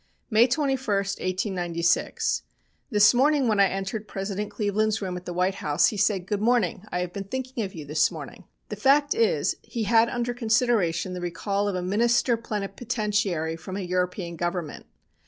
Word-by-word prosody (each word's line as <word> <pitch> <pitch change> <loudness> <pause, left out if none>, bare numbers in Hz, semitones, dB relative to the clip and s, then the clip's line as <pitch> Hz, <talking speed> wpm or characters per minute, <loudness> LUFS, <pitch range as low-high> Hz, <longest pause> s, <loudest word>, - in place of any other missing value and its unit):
"May 225 +3 +6
21, 270 0 0
1896. 185 -5 0 0.5
This 210 +2 +6
morning 275 +1 +3
when 215 -2 +2
I 200 - +6
entered 195 +3 -4
President 200 +1 -4
Cleveland's 215 0 0
room 185 -3 -4
at 180 0 -7
the - - -3
White 180 +2 +1
House, 145 0 +3
he 215 - -5
said: 195 -2 +1
'Good 205 +1 -2
morning, 220 -4 +1
I 180 - -1
have 180 -1 -4
been 200 -1 -5
thinking 255 +2 -4
of 190 -2 -6
you 155 -3 -7
this 150 +2 +2
morning.' - - -9 0.2
"The - - -4
fact 285 +2 +4
is 455 +1 +1
he 230 -3 -4
had 225 +2 +4
under 245 0 -2
consideration 220 -7 +1
the 180 - -5
recall 195 +4 -2
of 200 - -1
a 180 - -2
minister 235 +5 +2
plenipotentiary 205 -6 -2
from 185 +4 -7
a - - -3
European 180 -1 -2
Government. 175 -2 -4
200 Hz, 175 wpm, -25 LUFS, 180-230 Hz, 0.5 s, May